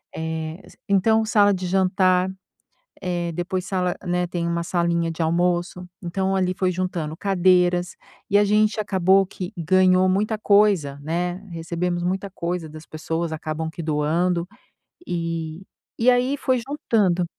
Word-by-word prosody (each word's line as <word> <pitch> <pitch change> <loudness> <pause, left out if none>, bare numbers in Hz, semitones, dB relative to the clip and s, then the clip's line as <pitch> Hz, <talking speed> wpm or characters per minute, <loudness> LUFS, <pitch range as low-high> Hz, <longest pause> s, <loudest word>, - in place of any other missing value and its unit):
Eh, 160 +2 -4
assim - - -18
então 220 +3 +3
sala 205 -2 +4
de 185 -1 -3
jantar, 185 0 +2 0.7
eh, 175 -1 -2
depois 180 +2 -3
sala 180 -2 -1
né, 180 0 0
tem 170 -1 -3
uma 170 0 -1
salinha 170 -1 0
de 165 - -5
almoço, 175 +2 0 0.2
então 190 +2 -1
ali 185 -1 +1
foi 185 -2 +1
juntando 170 -4 -3
cadeiras 180 -2 +2 0.3
e 205 - +4
a 205 - +5
gente 215 +1 +2
acabou 190 -1 +3
que 180 -1 -7
ganhou 185 +2 +4
muita 210 +3 0
coisa, 200 -10 +3
né, 175 +3 -2 0.2
recebemos 170 +1 -2
muita 190 +2 -2
coisa 170 -3 -4
das 155 +1 -11
pessoas, 160 +1 -3
acabam 155 +1 -4
que 170 - -7
doando. 165 +3 0 0.6
E 165 0 -3 0.4
e 245 +2 +5
aí 250 +3 +2
foi 255 -3 0
juntando. 200 - +1
180 Hz, 145 wpm, -23 LUFS, 170-190 Hz, 0.7 s, a